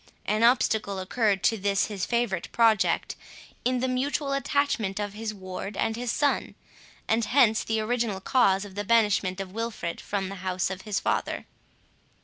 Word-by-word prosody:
An 215 +1 0
obstacle 220 -4 +3
occurred 195 +1 0
to 225 - +2
this 200 0 +1
his 200 -3 -4
favourite 235 -7 -1
project, 225 -3 +2 0.5
in 250 0 +1
the 260 - +1
mutual 275 +2 -1
attachment 275 -8 0
of 205 -1 -3
his 220 +1 -4
ward 190 0 -7
and 225 0 0
his 240 0 -2
son 290 +2 0 0.5
and 225 +1 +2
hence 225 -2 +4
the 225 0 -1
original 220 -2 -1
cause 195 -2 +2
of 200 - -11
the 205 +1 -3
banishment 205 -4 +2
of 190 -1 -5
Wilfred 225 -6 -4
from 195 -2 -3
the 195 - -6
house 185 0 -1
of 190 0 -5
his 200 - +1
father. - - -1
215 Hz, 165 wpm, -27 LUFS, 195-235 Hz, 0.5 s, hence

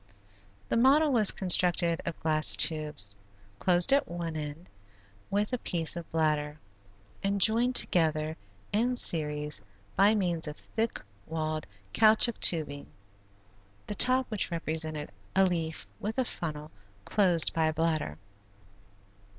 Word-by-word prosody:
The - - 0
model 280 +5 +4
was 220 -6 +5
constructed 175 -2 +2
of 170 - -5
glass 155 -1 +3
tubes, 150 -11 +1 0.4
closed 180 +5 +4
at 280 - +2
one 170 -2 -5
end 150 +3 -7 0.6
with 205 +4 -1
a 250 - -1
piece 165 -5 0
of 170 -1 -8
bladder, 150 -2 -1 0.7
and 200 0 -1
joined 235 +5 +4
together 155 -5 +2 0.4
in 240 +4 +1
series 150 - 0 0.3
by 200 +3 +4
means 175 -6 -1
of 150 - -7
thick 225 0 -4 0.3
walled 155 -1 -4 0.3
caoutchouc 220 +1 +4
tubing; 150 -4 +2 1.0
the - - -5
top 255 +5 +2
which 210 -3 -2
represented 160 -3 -4 0.2
a 190 0 +4
leaf 165 -3 -3
was 215 +4 -5
a 260 - +1
funnel 155 -6 -6 0.3
closed 180 -6 +2
by 160 -1 +1
a 155 - -1
bladder. 155 - -2
170 Hz, 125 wpm, -28 LUFS, 155-210 Hz, 1.0 s, was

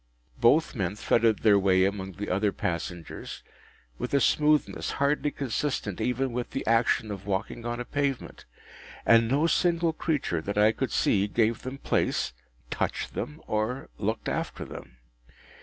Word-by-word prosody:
Both 140 +7 +4
men 100 -6 -2
threaded 115 0 +2
their 105 -2 +6
way 95 -1 +4
among 95 -1 -3
the 105 +3 -5
other 100 +2 +2
passengers 85 -1 -5 0.6
with - - -2
a - - +5
smoothness 150 +1 +2
hardly 145 +1 +1
consistent 135 -7 -2
even 125 +1 0
with 120 0 -3
the 135 - -4
action 115 -1 +2
of 95 -1 -7
walking 105 +4 -2
on 120 0 -3
a 125 - -4
pavement; 140 -1 -3 0.6
and 115 0 +6
no 140 +6 +2
single 170 -1 +2
creature, 145 - -1
that 100 +4 -4
I 105 +1 +6
could 130 +3 -3
see, 100 0 +2
gave 110 +2 +1
them 130 +2 -6
place, 65 - 0 0.4
touched - - -2
them, 150 +1 -5
or 110 +5 -2
looked 110 +2 -2
after - - -3
them. 65 - -10
115 Hz, 155 wpm, -27 LUFS, 100-140 Hz, 0.6 s, their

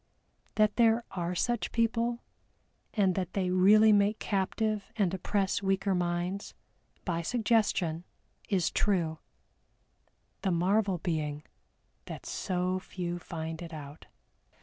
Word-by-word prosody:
That 215 -1 +3
there 230 0 +4
are 180 -1 -3
such 240 +5 0
people, 230 +1 0 0.7
and 195 -4 +3
that 185 -1 -3
they 185 -2 0
really 210 +4 +6
make 205 +1 +3
captive 210 +1 -1
and 195 -5 +1
oppress 195 +1 0
weaker 195 0 +1
minds, 175 +2 -2 0.5
by 170 -2 -1
suggestion, 205 -6 +1 0.5
is 185 -5 +1
true; 170 -6 0 1.2
the 195 - 0
marvel 190 +3 +2
being 155 -3 -2 0.6
that - - -8
so 185 0 -1
few 175 -2 -5
find 165 -1 -6
it 170 -1 -8
out. 145 0 -9
190 Hz, 115 wpm, -30 LUFS, 175-210 Hz, 1.2 s, really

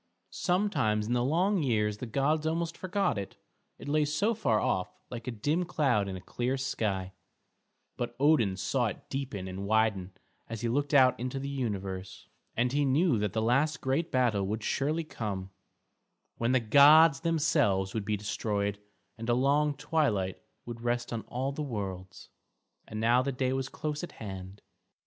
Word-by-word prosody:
Sometimes 150 - +1
in 120 - -1
the 120 0 +2
long 180 +8 +2
years 105 -6 0
the 125 - -5
gods 150 +6 +1
almost 165 +1 -1
forgot 185 - -1
it, 100 - -7 0.4
it - - -10
lay 150 +1 +2
so 155 +10 +1
far 155 - +1
off, 95 -1 0 0.2
like 120 0 -7
a - - -1
dim 145 +11 0
cloud 130 - +1
in 95 - -4
a - - -9
clear 125 +7 -2
sky; 100 -8 -2 0.8
but 120 0 -3
Odin 130 -10 +3
saw 120 +5 0
it - - -7
deepen 130 -9 -4
and 95 +2 -5
widen 105 -4 +1 0.4
as 115 -1 -5
he 120 - 0
looked 145 +4 0
out 130 -3 +5
into 125 +2 -3
the 135 +1 -4
universe, 100 -8 -4 0.3
and 120 +2 +2
he 145 +2 +1
knew 140 - +3
that 105 -2 -1
the 110 - 0
last 140 +7 +2
great 140 +6 -1
battle 115 -7 +2
would 110 +2 -3
surely 155 +8 0
come, 100 -10 -5 0.9
when 115 +1 +1
the 130 - +4
gods 145 +6 +7
themselves 145 - +1
would 110 - -2
be 105 +1 -1
destroyed 100 0 -2 0.4
and 115 +1 -5
a 120 - +4
long 145 +3 +2
twilight 130 - 0 0.2
would 120 -1 -7
rest 120 0 -1
on 115 - -2
all 130 +3 -2
the 145 - -5
worlds; 95 -8 -6 0.6
and 110 - -6
now 120 +3 +4
the 140 +2 -1
day 130 0 -1
was 135 0 -2
close 150 +2 -4
at 175 - -7
hand. 95 -1 -8
125 Hz, 175 wpm, -30 LUFS, 105-145 Hz, 0.9 s, gods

